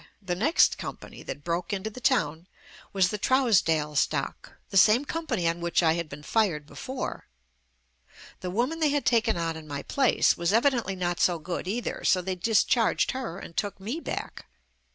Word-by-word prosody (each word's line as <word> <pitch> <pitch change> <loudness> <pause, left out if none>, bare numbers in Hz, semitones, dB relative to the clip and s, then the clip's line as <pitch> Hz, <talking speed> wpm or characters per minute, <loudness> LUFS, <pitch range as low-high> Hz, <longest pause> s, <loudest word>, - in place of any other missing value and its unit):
The 190 -4 -3
next 260 - +3
company - - -8
that 145 - -7
broke 170 +1 -2
into 200 +2 -3
the 255 - -10
town 170 - +1 0.4
was, 190 -2 +2
"The 210 - -4
Trousdale 180 - +2
Stock," - - -1 0.2
the - - -6
same 225 +8 +6
com 330 +2 -4
pany 190 -10 0
on 170 +1 -1
which 170 +1 +1
I 160 -1 +4
had 170 -2 -3
been 150 +1 -9
fired 175 -7 0
before. 260 - -6 1.1
The 180 - -5
woman 245 - -1
they 310 -2 +3
had 290 0 0
taken 225 -4 +2
on 165 -1 -2
in 160 -1 -10
my 140 -1 -5
place 270 -3 +2
was 170 +3 0
evi 240 +6 +5
dently 210 -7 -3
not 175 -1 -2
so 175 -2 +3
good 175 +3 -5
either, 230 +5 -3
so 185 - +4
they 185 +1 -3
discharged 220 +4 +2
her 255 -9 -5
and 170 - -10
took 205 -1 -2
me 225 +11 -4
back. - - -6
195 Hz, 190 wpm, -27 LUFS, 170-240 Hz, 1.1 s, same